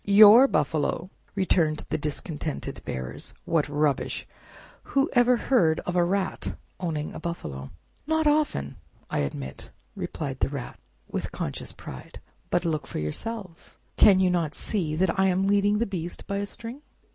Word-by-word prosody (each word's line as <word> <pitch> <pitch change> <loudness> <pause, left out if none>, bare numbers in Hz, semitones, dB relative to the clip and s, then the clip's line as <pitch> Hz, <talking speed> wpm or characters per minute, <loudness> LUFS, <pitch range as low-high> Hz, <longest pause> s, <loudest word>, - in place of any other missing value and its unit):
"Your 210 +5 +9
buffalo!" 155 - 0 0.2
returned 170 -6 +1
the - - +1
discontented 150 +1 -4
bearers. 65 +3 -5
"What 160 -3 +1
rubbish! 145 -1 0 0.5
Whoever 250 -3 +3
heard 175 -13 +3
of 180 - -3
a 175 - +4
rat 190 +2 -1 0.2
owning 155 -4 -2
a - - -6
buffalo?" 70 - -5 0.4
"Not 315 0 +2
often, 295 - +1 0.3
I - - 0
admit," 70 -2 -4 0.3
replied 135 -4 -4
the - - +1
Rat 135 -3 -6 0.3
with - - -4
conscious - - -4
pride; - - -10 0.3
"but 175 0 +1
look 155 -3 -1
for - - -5
yourselves. 185 - -5 0.2
Can 195 -3 +7
you 185 -1 +4
not 165 -4 0
see 165 -8 -1
that 185 +2 +1
I 190 - +5
am 190 +1 +2
leading 205 +1 +3
the 230 - +1
beast 175 -4 -5
by 200 - -2
a 200 0 -2
string?" 235 +6 -8
175 Hz, 150 wpm, -26 LUFS, 150-205 Hz, 0.5 s, Your